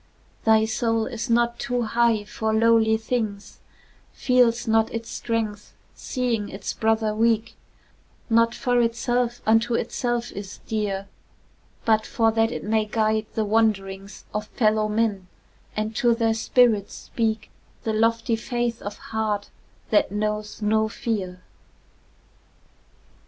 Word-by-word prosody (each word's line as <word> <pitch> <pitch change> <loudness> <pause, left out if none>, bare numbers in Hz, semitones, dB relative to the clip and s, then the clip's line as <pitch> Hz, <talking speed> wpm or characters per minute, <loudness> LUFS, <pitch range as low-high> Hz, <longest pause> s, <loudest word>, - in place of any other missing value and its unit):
Thy 220 -1 +5
soul 225 0 0
is 235 0 -5
not 235 0 +2
too 245 0 -1
high 230 -1 +2
for 220 +1 -3
lowly 220 0 +4
things, 220 -3 -3 0.5
Feels 245 -2 +2
not 225 0 +3
its 230 0 -5
strength 220 -3 -3 0.2
seeing 240 -5 -2
its 195 - -5
brother 220 -1 +1
weak, 225 0 +1 0.7
Not 230 0 +3
for 245 -2 +1
itself 240 +1 0
unto 225 +2 +3
itself 240 0 -2
is 200 -1 -8
dear, 200 -3 -2 0.8
But 220 -1 +2
for 225 -1 +2
that 225 +1 +2
it - - -5
may 215 +1 +1
guide 215 0 0
the 220 - +1
wanderings 200 -2 -1
Of 210 0 -3
fellow 215 -2 +1
men, 210 -3 0 0.5
and 215 +1 -2
to 240 -1 +3
their 225 -1 +2
spirits 225 -2 +2
speak 220 -2 -2 0.3
The 220 - -1
lofty 230 +1 +2
faith 240 +1 -2
of 205 0 -6 0.2
heart 210 -2 -1 0.4
that 210 - +3
knows 210 +1 -3
no 220 +1 +2
fear. 190 -6 -4
220 Hz, 125 wpm, -24 LUFS, 215-230 Hz, 0.8 s, Thy